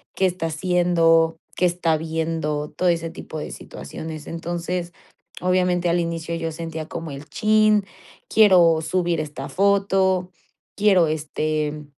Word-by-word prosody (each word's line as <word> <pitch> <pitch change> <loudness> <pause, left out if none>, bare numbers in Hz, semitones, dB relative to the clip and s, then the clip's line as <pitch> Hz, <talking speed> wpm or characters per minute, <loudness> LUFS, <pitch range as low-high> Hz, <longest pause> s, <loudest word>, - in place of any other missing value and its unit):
qué 190 - +2
está 180 -2 -1
haciendo, 165 -1 +2 0.2
qué 180 - +2
está 175 -2 +1
viendo, 160 -2 -2
todo 185 - -1
ese 165 -1 0
tipo 160 - -8
de 150 - -5
situaciones. 155 - -8
Entonces, 175 +1 -4 0.5
obviamente 180 -1 +1
al 170 +1 +2
inicio 170 -1 -3
yo 165 0 -3
sentía 160 -1 -6
como 165 -2 -6
el 140 +1 -8
chin, 215 -1 +3 0.4
quiero 180 -7 +6
subir 170 +1 0
esta 150 -3 -5
foto, 190 -2 +2 0.4
quiero, 195 -5 +4
este, 155 0 -2
165 Hz, 130 wpm, -22 LUFS, 160-180 Hz, 0.5 s, quiero